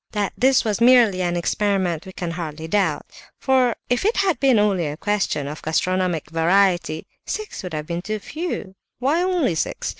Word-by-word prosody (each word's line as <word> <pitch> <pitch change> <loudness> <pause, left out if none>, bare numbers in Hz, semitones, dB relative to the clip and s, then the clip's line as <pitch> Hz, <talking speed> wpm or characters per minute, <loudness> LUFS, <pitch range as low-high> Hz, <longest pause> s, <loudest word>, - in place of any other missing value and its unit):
That 205 -2 -1
this 260 0 +3
was 215 0 -1
merely 235 -6 +5
an 175 -1 0
experiment 190 -2 0
we - - -8
can 175 -2 -5
hardly 160 -2 -6
doubt: 175 -4 0 0.3
for 260 -3 +2
if 245 0 0
it 435 +4 +1
had 380 -4 +1
been 265 -4 +4
only 200 -6 +2
a 145 +1 -5
question 200 -8 -1
of 150 +2 -7
gastronomic 175 -1 -1
variety, 175 -1 +2 0.2
six 430 0 -5
would 180 -4 -7
have 150 0 -4
been 170 +1 -4
too 215 +3 -3
few; 305 - -5 0.2
why 285 +7 +1
only 360 - +1
six? 160 - -2
195 Hz, 180 wpm, -22 LUFS, 170-245 Hz, 0.3 s, merely